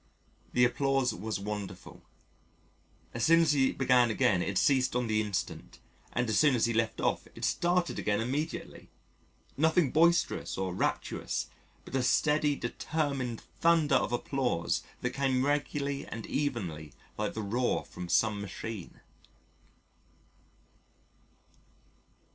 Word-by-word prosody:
The 125 Hz, 0 st, +5 dB
applause 135 Hz, +1 st, +1 dB
was 105 Hz, +3 st, -4 dB
wonderful. 100 Hz, -2 st, -6 dB, 1.1 s
As 115 Hz, -, -2 dB
soon 165 Hz, +4 st, +6 dB
as 160 Hz, -2 st, +3 dB
he 135 Hz, -2 st, +3 dB
began 125 Hz, -2 st, +3 dB
again 100 Hz, -4 st, +2 dB
it 95 Hz, +1 st, -1 dB
ceased 130 Hz, -2 st, +3 dB
on 125 Hz, 0 st, +1 dB
the 110 Hz, -1 st, +1 dB
instant, 105 Hz, -4 st, -4 dB, 0.3 s
and 120 Hz, 0 st, 0 dB
as 110 Hz, -, +2 dB
soon 150 Hz, -4 st, +5 dB
as 115 Hz, -, +2 dB
he 115 Hz, -, 0 dB
left 115 Hz, 0 st, 0 dB
off -, -, 0 dB
it -, -, -3 dB
started 175 Hz, 0 st, +1 dB
again 105 Hz, -1 st, 0 dB
immediately 140 Hz, +8 st, -4 dB, 0.7 s
nothing 160 Hz, -1 st, +3 dB
boisterous 170 Hz, +2 st, +2 dB
or 95 Hz, -1 st, -2 dB
rapturous -, -, -2 dB, 0.3 s
but -, -, -12 dB
a 135 Hz, -, +2 dB
steady, 150 Hz, +3 st, +2 dB
determined 135 Hz, -1 st, -2 dB, 0.2 s
thunder 165 Hz, -3 st, +3 dB
of -, -, +2 dB
applause 120 Hz, -7 st, -1 dB, 0.2 s
that 125 Hz, -, -1 dB
came 130 Hz, -1 st, +1 dB
regularly 140 Hz, -1 st, -1 dB
and 115 Hz, -, -6 dB
evenly 95 Hz, -, -3 dB, 0.2 s
like 105 Hz, -, -3 dB
the 110 Hz, -, -3 dB
roar 120 Hz, +5 st, 0 dB
from 90 Hz, -1 st, -8 dB
some 105 Hz, +4 st, +2 dB
machine. 100 Hz, -1 st, -7 dB
125 Hz, 130 wpm, -30 LUFS, 110-145 Hz, 1.1 s, soon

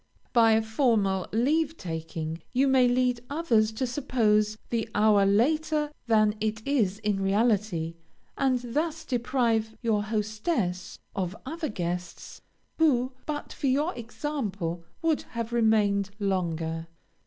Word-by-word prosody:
By 225 Hz, -2 st, +6 dB
a 220 Hz, 0 st, +3 dB
formal 220 Hz, -5 st, +1 dB
leave 300 Hz, +8 st, +1 dB
taking, 160 Hz, -1 st, -5 dB
you 265 Hz, +2 st, +3 dB
may 260 Hz, -2 st, +5 dB
lead 250 Hz, -1 st, +1 dB
others 240 Hz, -8 st, +2 dB
to 240 Hz, +4 st, -1 dB
suppose 220 Hz, -5 st, +1 dB
the 230 Hz, -1 st, -1 dB
hour 205 Hz, -2 st, +5 dB
later 300 Hz, +8 st, +2 dB, 0.2 s
than 215 Hz, -2 st, +4 dB
it 220 Hz, 0 st, -2 dB
is 220 Hz, -9 st, +1 dB
in 210 Hz, -2 st, -1 dB
reality, 195 Hz, -5 st, +1 dB, 0.4 s
and 250 Hz, -3 st, 0 dB
thus 320 Hz, +2 st, -1 dB
deprive 235 Hz, -4 st, 0 dB
your 220 Hz, -3 st, +2 dB
hostess 215 Hz, -, -2 dB, 0.2 s
of 185 Hz, 0 st, -2 dB
other 320 Hz, +3 st, -3 dB
guests, 175 Hz, -2 st, -5 dB, 0.4 s
who, 260 Hz, -5 st, +3 dB, 0.2 s
but 295 Hz, -1 st, -4 dB
for 280 Hz, -, -2 dB
your 290 Hz, +7 st, +1 dB
example, 220 Hz, -, -4 dB, 0.2 s
would 325 Hz, -2 st, +2 dB, 0.2 s
have 230 Hz, 0 st, -3 dB
remained 210 Hz, -4 st, +3 dB
longer. 165 Hz, -5 st, -2 dB
220 Hz, 125 wpm, -27 LUFS, 200-260 Hz, 0.4 s, By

